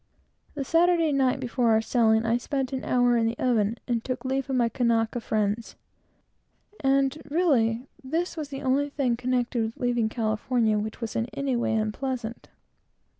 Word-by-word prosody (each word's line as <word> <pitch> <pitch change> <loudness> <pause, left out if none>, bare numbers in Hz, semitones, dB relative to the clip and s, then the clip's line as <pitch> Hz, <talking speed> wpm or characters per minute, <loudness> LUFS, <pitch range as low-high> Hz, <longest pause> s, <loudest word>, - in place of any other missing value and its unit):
The 285 - -2
Saturday 335 0 +3
night 270 -1 +2
before 245 -1 0
our 220 -1 +5
sailing, 225 -1 +2
I 230 +1 +2
spent 265 +2 -3
an 260 - -3
hour 245 -1 +3
in 225 -1 +2
the 230 +1 -2
oven, 230 -3 +1
and 235 -2 -1
took 255 -1 -4
leave 270 +1 -1
of 265 - 0
my 240 -2 +3
Kanaka 230 -1 0
friends; 215 +1 -1 1.0
and, 270 0 +2
really, 260 -8 +2 0.2
this 330 +7 -2
was 305 -3 -5
the 275 0 -6
only 275 +2 +1
thing 270 -4 0
connected 245 0 -1
with 220 +1 -5
leaving 240 -3 0
California 220 0 0
which 220 +3 -5
was 230 - -4
in 230 - 0
any 275 -2 -1
way 235 -2 0
unpleasant. 230 +2 -3
245 Hz, 170 wpm, -26 LUFS, 225-270 Hz, 1.0 s, our